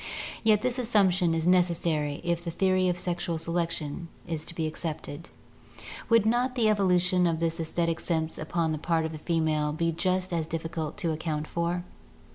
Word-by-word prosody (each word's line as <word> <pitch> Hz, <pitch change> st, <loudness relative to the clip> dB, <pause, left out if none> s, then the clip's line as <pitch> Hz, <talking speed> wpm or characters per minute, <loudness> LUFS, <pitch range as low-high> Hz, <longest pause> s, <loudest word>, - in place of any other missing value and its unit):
Yet 215 Hz, -1 st, +4 dB
this 255 Hz, 0 st, 0 dB
assumption 190 Hz, -7 st, +3 dB
is 165 Hz, 0 st, -1 dB
necessary 170 Hz, -5 st, +2 dB
if 170 Hz, 0 st, -1 dB
the 170 Hz, -, -3 dB
theory 185 Hz, +1 st, +2 dB
of 175 Hz, -, 0 dB
sexual 175 Hz, -2 st, -2 dB
selection 165 Hz, -1 st, -2 dB, 0.5 s
be 160 Hz, -, -1 dB
accepted. 155 Hz, 0 st, -5 dB, 0.8 s
Would 230 Hz, -2 st, +5 dB
not 245 Hz, +3 st, +2 dB
the 235 Hz, -3 st, +2 dB
evolu 195 Hz, -4 st, +4 dB
tion 180 Hz, 0 st, +2 dB
of 165 Hz, -1 st, 0 dB
this 165 Hz, 0 st, 0 dB
aesthetic 165 Hz, 0 st, -1 dB
sense 160 Hz, -2 st, -2 dB
upon 160 Hz, +1 st, -1 dB
the 155 Hz, -, -2 dB
part 165 Hz, 0 st, +1 dB
of 160 Hz, -, -3 dB
the 155 Hz, -, -7 dB
female 155 Hz, -2 st, +1 dB
be 165 Hz, +2 st, 0 dB
just 185 Hz, +2 st, 0 dB
as 165 Hz, -2 st, 0 dB
difficult 160 Hz, -1 st, -4 dB
to 175 Hz, -6 st, -1 dB
account 155 Hz, -1 st, -2 dB
for? 170 Hz, +2 st, -2 dB
170 Hz, 170 wpm, -28 LUFS, 160-185 Hz, 0.8 s, Would